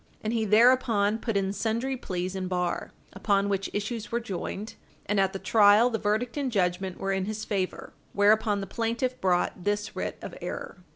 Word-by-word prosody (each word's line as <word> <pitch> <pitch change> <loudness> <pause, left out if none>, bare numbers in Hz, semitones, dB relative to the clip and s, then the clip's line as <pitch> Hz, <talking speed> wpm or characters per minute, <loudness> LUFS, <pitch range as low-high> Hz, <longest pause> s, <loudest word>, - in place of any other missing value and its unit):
And 220 +1 -1
he 225 -2 +1
thereupon 220 -1 +4
put 225 -4 -1
in 195 0 0
sundry 230 +5 -1
pleas 185 -5 -4
in 185 -1 -3
bar, 180 -1 -2 0.2
upon 200 0 +1
which 195 -1 -1
issues 210 +1 -4
were 235 - +1
joined, 205 0 -5 0.3
and 205 0 +1
at 195 -1 +3
the 195 - -4
trial 210 +4 +5
the 225 - -1
verdict 220 +5 -1
and 275 -3 -1
judgment 185 -2 0
were 195 - -2
in 190 -1 0
his 215 +1 -4
favor. 190 -3 -3 0.2
Whereupon 205 0 +3
the - - -4
plaintiff 235 +5 -2
brought 180 -1 +1
this 205 +1 -1
writ - - -3
of - - -6
error. - - -6
205 Hz, 185 wpm, -27 LUFS, 195-225 Hz, 0.3 s, trial